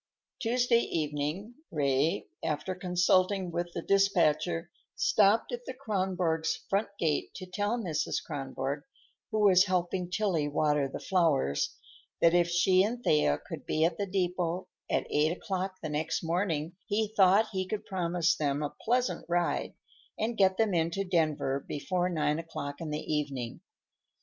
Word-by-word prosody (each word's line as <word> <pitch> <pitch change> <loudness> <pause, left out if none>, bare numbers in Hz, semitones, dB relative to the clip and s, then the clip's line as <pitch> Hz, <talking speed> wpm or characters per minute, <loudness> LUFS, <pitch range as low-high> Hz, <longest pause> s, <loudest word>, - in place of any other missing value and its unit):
Tuesday 245 0 +3
evening 155 +5 -2 0.2
Ray, 145 0 +1 0.2
after 155 +4 -2
consulting 185 +1 +2
with 175 +1 -3
the 170 - -4
dispatcher, 175 -4 +2 0.2
stopped 210 +1 +3
at 245 0 -4
the 260 - -5
Kronborgs' 185 -9 -1
front 200 +3 +2
gate 155 -5 -1
to 185 - -7
tell 205 +5 -1
Mrs. 160 -9 -2
Kronborg—who 145 - -5
was 195 -2 +6
helping 180 -1 -1
Tillie 180 -6 0
water 150 -1 +1
the - - -5
flowers—that 165 - 0
if 175 -1 +3
she 185 +2 +4
and 235 +5 -1
Thea 110 - +3
could - - -7
be 155 +1 +2
at 165 +2 -1
the 200 - -1
depot 180 -1 -1 0.2
at - - +1
eight 155 +4 +2
o'clock 190 0 -3
the 155 - -3
next 150 +3 -2
morning, 165 -1 -1
he 215 0 0
thought 200 +3 +5
he 190 -2 -2
could 215 +1 -4
promise 175 -2 +1
them 145 -1 -1
a 145 - -3
pleasant 250 +2 +1
ride 175 0 0 0.4
and 225 +2 -1
get 190 -2 +3
them 220 -3 +2
into 170 +3 0
Denver 155 -6 0
before 180 +5 -1
nine 150 -2 0
o'clock 145 -3 -6
in 160 - -4
the 150 0 -3
evening. 140 -6 -3
175 Hz, 145 wpm, -30 LUFS, 155-195 Hz, 0.4 s, was